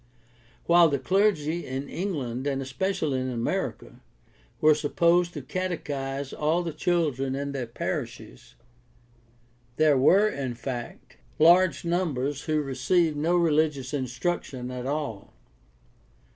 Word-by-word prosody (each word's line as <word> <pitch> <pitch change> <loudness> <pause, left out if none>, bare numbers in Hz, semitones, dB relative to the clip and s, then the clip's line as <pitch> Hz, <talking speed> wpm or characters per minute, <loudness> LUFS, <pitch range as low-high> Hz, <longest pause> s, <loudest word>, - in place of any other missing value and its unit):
While 170 -1 +6
the 140 - 0
clergy 175 -1 +1
in 135 +2 -5
England, 140 -9 -3
and 135 -1 -1
especially 135 +1 -1
in 130 - -2
America, 120 -2 -3 0.6
were 155 0 +6
supposed 170 +4 +2
to 145 - -5
catechize 140 -5 -4
all 160 +4 0
the 165 -2 -4
children 150 -6 0
of 140 0 -3
their 130 -3 -3
parishes, 60 - -6 1.2
there 150 -2 +4
were 195 +10 +5
in 135 - -3
fact 120 -1 -7 0.2
large 175 +3 +5
numbers 145 -6 -1
who 155 -1 0
received 150 +5 +1
no 160 +4 +1
religious 150 -5 +1
instruction 130 -1 -3
at 125 0 -5
all. 140 -8 -4
145 Hz, 115 wpm, -26 LUFS, 130-170 Hz, 1.2 s, While